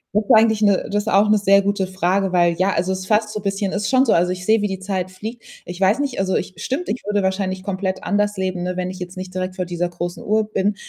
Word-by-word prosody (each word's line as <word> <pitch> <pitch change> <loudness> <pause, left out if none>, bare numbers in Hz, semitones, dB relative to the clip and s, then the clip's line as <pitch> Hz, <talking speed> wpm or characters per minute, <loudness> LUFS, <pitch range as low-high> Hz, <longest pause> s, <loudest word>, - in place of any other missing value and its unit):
Ist 210 0 +1
eigentlich 220 -1 +5
'ne 200 -2 +3
das 205 +1 0
ist - - -12
auch 205 0 +4
'ne 210 0 +4
sehr 200 0 +4
gute 200 -1 0
Frage, 190 +1 0
weil, 175 -1 +3
ja 185 +3 +1
also, 180 +2 0
es 190 - -2
ist 185 - -8
fast 215 +1 +2
so 215 - -3
bisschen 195 -1 -2
ist 200 +1 -2
schon 260 0 +4
so. 230 - +3
Also, 175 +2 +2
ich 180 0 -5
sehe, 220 +1 +3
wie 210 - +1
die 190 -1 -4
Zeit 190 -1 -3
fliegt. 220 +6 -8 0.2
Ich 175 +1 -8
weiß 195 +3 +4
nicht 280 -3 -2
also, 190 -1 0
ich 185 - -2
stimmt, 275 - -3
ich 245 - -3
würde 205 -1 +1
wahrscheinlich 190 0 -1
komplett 190 -1 -3
anders 205 0 0
leben, 185 -1 -2
ne, 180 0 -3
wenn 185 0 -2
ich 185 - -10
jetzt 180 +1 -7
nicht 185 0 -7
direkt 185 0 -3
vor 185 - -2
dieser 175 0 -2
großen 175 0 -5
Uhr 215 +1 +2
bin. 205 +1 0
190 Hz, 280 wpm, -20 LUFS, 185-210 Hz, 0.2 s, eigentlich